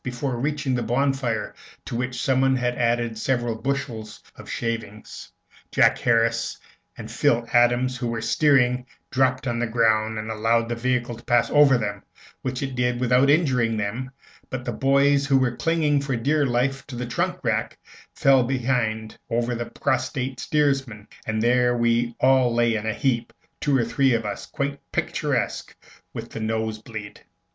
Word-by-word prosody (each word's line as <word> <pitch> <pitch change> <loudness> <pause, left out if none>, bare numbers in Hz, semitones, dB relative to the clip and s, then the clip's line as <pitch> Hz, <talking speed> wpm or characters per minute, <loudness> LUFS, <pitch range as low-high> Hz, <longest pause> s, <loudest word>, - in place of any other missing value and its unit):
Before 125 +1 -3
reaching 140 +1 -1
the 125 - 0
bonfire, 125 -1 -1 0.3
to - - -5
which 125 +1 -3
someone 135 0 +2
had 125 -1 0
added 120 -1 0
several 120 -1 0
bushels 115 -3 -4
of - - -12
shavings, 115 -2 -5 0.4
Jack - - +4
Harris 115 -1 +1 0.4
and - - -8
Phil 115 0 +2
Adams, 120 +1 +3
who 120 - -3
were 115 -1 -2
steering, 125 -4 +2 0.2
dropped 130 0 +1
on 120 -2 -1
the 120 - 0
ground, 110 -1 +2
and 110 +1 -4
allowed 115 +1 +1
the 120 - -1
vehicle 120 0 -1
to 120 - -15
pass 120 -1 +2
over 145 -3 +6
them, 100 -3 -3 0.4
which 130 0 -3
it 135 -1 -4
did 125 -1 0
without 125 +2 +3
injuring 130 -8 +2
them; 110 +5 -3 0.4
but 130 -1 -5
the - - -2
boys 140 +1 +3
who 135 -2 +4
were 125 -2 +1
clinging 155 -3 +1
for 135 -2 -2
dear 145 +5 +1
life 130 +3 -1
to 135 - -8
the 125 +1 -3
trunk 120 - -1
rack - - -1 0.7
behind 120 -4 -1
fell 115 - -4
over 120 +1 0
the 120 0 -4
prostrate 130 -2 -2
steersman, 135 -9 0 0.2
and 110 0 -1
there 125 0 +3
we 120 0 +1
all 130 -2 +4
lay 120 0 +2
in 110 0 -2
a 110 - 0
heap, 125 -4 0 0.3
two 140 -2 +2
or 120 - +1
three 130 +1 +2
of 115 -1 -2
us 100 -1 -5
quite 140 0 -3
picturesque - - -2 0.4
with - - -7
the - - -6
nose 110 0 -2
bleed. 110 -3 -9
120 Hz, 170 wpm, -24 LUFS, 115-135 Hz, 0.7 s, over